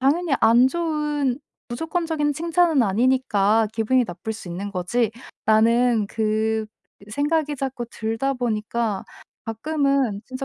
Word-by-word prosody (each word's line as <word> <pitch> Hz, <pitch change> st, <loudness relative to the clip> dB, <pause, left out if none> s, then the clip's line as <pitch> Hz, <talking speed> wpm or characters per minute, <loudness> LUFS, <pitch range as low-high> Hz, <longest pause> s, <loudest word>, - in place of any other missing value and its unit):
당연히 305 Hz, +4 st, +1 dB
안 240 Hz, +3 st, +6 dB
좋은 300 Hz, -5 st, -1 dB, 0.3 s
무조건적인 320 Hz, +2 st, -1 dB
칭찬은 330 Hz, -3 st, +2 dB
아니니까 220 Hz, -1 st, +2 dB
기분이 235 Hz, +3 st, +2 dB
나쁠 200 Hz, +5 st, -5 dB
수 215 Hz, -5 st, -9 dB
있는 195 Hz, +4 st, -5 dB
거지.'라는 225 Hz, +2 st, +1 dB
그 220 Hz, 0 st, 0 dB, 0.4 s
생각이 295 Hz, +2 st, 0 dB
자꾸 260 Hz, -2 st, -3 dB
들다 225 Hz, +5 st, -2 dB
보니까 225 Hz, -3 st, -2 dB, 0.4 s
가끔은 275 Hz, -2 st, 0 dB
진짜 255 Hz, +1 st, -5 dB
245 Hz, 265 characters per minute, -23 LUFS, 220-290 Hz, 0.4 s, 안